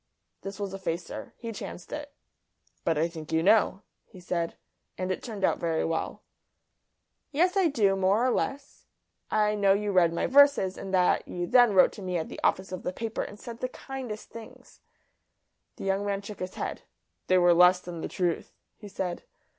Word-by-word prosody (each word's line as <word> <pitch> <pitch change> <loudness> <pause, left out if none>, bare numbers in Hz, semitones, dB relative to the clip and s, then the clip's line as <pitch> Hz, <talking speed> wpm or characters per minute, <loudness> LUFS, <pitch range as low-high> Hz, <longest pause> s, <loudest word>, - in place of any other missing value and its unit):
This 195 +1 -7
was 200 -2 -4
a 195 - -5
facer. 170 -2 -5
He 230 -1 -6
chanced 185 -4 -8
it. 295 -1 -6 0.7
"But 165 -2 +1
I 160 +2 +2
think 160 -2 -9
you 160 0 +2
know," 205 0 +3 0.2
he 190 - -14
said; 170 -1 -3 0.4
and 185 0 -2
it 185 - -3
turned 215 -5 -7
out - - +2
very 165 -1 0
well. 165 0 -3 1.1
"Yes, 355 +6 +2
I 385 -3 +4
do, 215 -10 +2
more 195 +5 +2
or 255 - +3
less. 280 +3 -3 0.4
I 210 -1 +2
know 200 -2 +4
you 205 +1 -1
read 180 -3 +4
my 170 - -1
verses, 280 -9 +5
and 195 - -7
that 180 -1 +2
you 175 0 -3
then 240 0 +5
wrote 185 - +6
to 210 - -11
me 180 -2 -2
at 160 - -3
the - - -8
office 190 0 +1
of 185 - -5
the 180 - -3
paper 225 +4 -4
and 205 - -7
said 235 -1 -8
the 255 - -2
kindest 255 -6 -7
things." 230 -1 -12 0.9
The - - -9
young 195 +1 0
man 200 -1 -2
shook 205 0 -8
his 185 0 -5
head. - - -4 0.5
"They 185 - +4
were 175 -1 +6
less 180 +1 +6
than 175 -2 -7
the - - -3
truth," 175 -2 -2 0.2
he 210 - -10
said. 185 -3 -4
195 Hz, 195 wpm, -28 LUFS, 180-220 Hz, 1.1 s, wrote